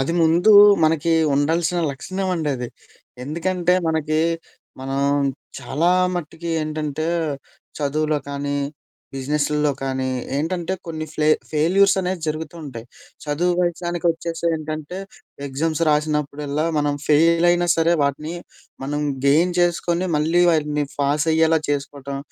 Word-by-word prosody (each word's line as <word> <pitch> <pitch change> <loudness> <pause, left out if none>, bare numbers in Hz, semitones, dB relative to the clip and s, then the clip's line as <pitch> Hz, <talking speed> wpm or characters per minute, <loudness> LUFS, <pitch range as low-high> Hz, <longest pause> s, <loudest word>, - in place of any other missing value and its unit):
అది 135 +5 0
ముందూ 170 +6 +4 0.3
మనకి 160 +1 +2 0.2
ఉండాల్సిన 165 +4 +1
లక్షణవండి 180 +1 -2
అది. 125 -1 -5 0.6
ఎందుకంటే, 175 +4 0
మనకి 155 -1 0 0.6
మనం 135 +1 -2 0.6
చాలా 160 +6 0 0.2
మట్టికి 170 0 -5
ఏంటంటే, 155 0 -3 0.7
చదువులో 150 +1 0
కానీ, 140 0 -3 0.6
బిజినెసుల్లో 150 +2 0
కానీ, 130 -1 -2 0.3
ఏంటంటే 170 +4 -2
కొన్ని 160 -1 -4
ఫ్లె 155 -1 +1 0.2
ఫెయిల్యూర్స్ 185 +7 +3
అనేది 185 -1 -2
జరుగుతూ 155 +1 -4
ఉంటాయి. 120 -5 -8 0.4
చదువు 160 +4 0
విషయానికొచ్చేసి 170 -1 -2
ఏంటంటే, 155 +3 -6 0.5
ఎగ్జమ్స్ 155 +4 -1
రాసినప్పుడల్లా, 150 0 -1
మనం 145 -1 +1
ఫెయిలయినా 170 +3 +4
సరే, 165 +1 +3
వాటిని 145 +4 -2 0.5
మనం 145 +2 -2 0.3
గెయిన్ 165 +6 +3
చేసుకొని, 175 +1 +1
మళ్ళీ 165 +4 +2
వాటిని 150 -2 0
ఫాసయ్యేలా 160 +3 +2
చేసుకోటం. 140 -1 -3
155 Hz, 105 wpm, -21 LUFS, 145-170 Hz, 0.7 s, ముందూ